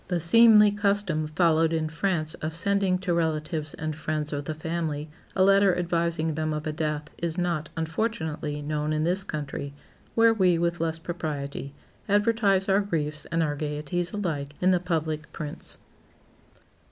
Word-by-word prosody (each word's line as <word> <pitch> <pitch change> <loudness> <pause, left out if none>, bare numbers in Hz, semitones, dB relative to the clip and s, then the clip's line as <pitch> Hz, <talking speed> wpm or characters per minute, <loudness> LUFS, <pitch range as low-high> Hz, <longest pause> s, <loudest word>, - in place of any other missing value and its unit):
The 180 -2 0
seemly 210 +4 +7
custom 200 -6 +1
followed 160 0 +3
in 160 -1 0
France 165 -1 -1
of 160 +1 -3
sending 195 +1 +2
to 180 -1 -1
relatives 155 -2 -1
and 155 -1 -4
friends 155 -1 -3
of 145 -1 -3
the 155 - -3
family 155 -2 -3 0.2
a 185 - +4
letter 195 -1 +5
advising 170 -2 0
them 155 0 -1
of 150 0 -4
a 155 - -1
death 150 -1 -2 0.2
is 170 0 -2
not, 170 -4 -1
unfortunately, 160 -4 -2
known 150 +1 -1
in 155 0 0
this 180 +4 +1
country, 140 -4 -5 0.4
where 230 0 +6
we, 185 -5 +3
with 170 +1 0
less 165 -1 -1
propriety, 145 -4 -5 0.3
advertise 205 -2 +3
our 195 +1 +4
griefs 155 -6 -2
and 165 0 0
our 145 -2 -1
gaieties 150 +4 -3
alike 150 -8 -3
in 185 +1 +3
the 180 - +3
public 160 -3 -2
prints. 150 -3 -6
165 Hz, 160 wpm, -26 LUFS, 155-185 Hz, 0.4 s, seemly